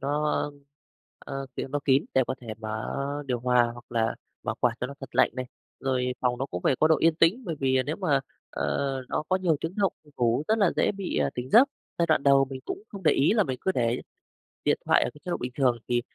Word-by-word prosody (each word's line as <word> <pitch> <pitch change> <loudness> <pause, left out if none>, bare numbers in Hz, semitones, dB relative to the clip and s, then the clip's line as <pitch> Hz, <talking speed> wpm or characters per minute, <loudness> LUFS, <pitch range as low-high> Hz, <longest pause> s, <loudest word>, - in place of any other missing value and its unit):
nó, 150 +2 0 0.8
ơ, 135 0 -6
kiểu, - - -3
nó 145 +2 -1
kín 135 0 +4
để 130 - +5
có 130 - -2
thể 120 - -13
mở 110 0 -4 0.3
điều 125 -2 -1
hòa 125 -1 +3
hoặc 120 0 -12
là 115 -1 +1 0.3
mở - - -2
quạt 125 - +3
cho 125 - -1
nó 140 - -8
thật 135 - -10
lạnh - - +5
này. 130 -1 -4 0.3
Rồi 125 -1 0
phòng 125 -1 +1
nó 135 - -2
cũng 90 - -5
phải 130 - +3
có 155 - +5
độ 160 - +5
yên 165 0 +4
tĩnh, 170 +10 +3
bởi 165 -5 -3
vì 130 -1 +3
nếu 155 - -2
mà, 150 -8 +2 0.3
ờ, 140 -1 -1 0.2
nó - - -1
có 185 - +3
nhiều 175 -5 +1
tiếng 165 +3 -4
động 195 -3 +2
thì 150 - -20
ngủ 120 +3 +2
rất 220 - +3
là 200 -5 +4
dễ - - +3
bị, 195 -2 -4
à, 70 -1 +1
tỉnh 125 +1 -5
giấc. 255 - +7 0.3
Giai 170 - +3
đoạn 155 -4 +3
đầu 140 -1 +5
mình 130 -1 -7
cũng 390 +2 -5
không 200 -3 -9
để 155 -4 +5
ý 145 +8 +3
là 215 -2 +4
mình 130 -3 -3
cứ 190 - +1
để 120 -3 0 0.7
điện - - +3
thoại - - +4
ở - - -2
cái 150 - -15
chế 180 - -5
độ - - 0
bình 125 0 -4
thường, 125 -3 +3
thì 120 0 +1
135 Hz, 255 wpm, -27 LUFS, 125-165 Hz, 0.8 s, giấc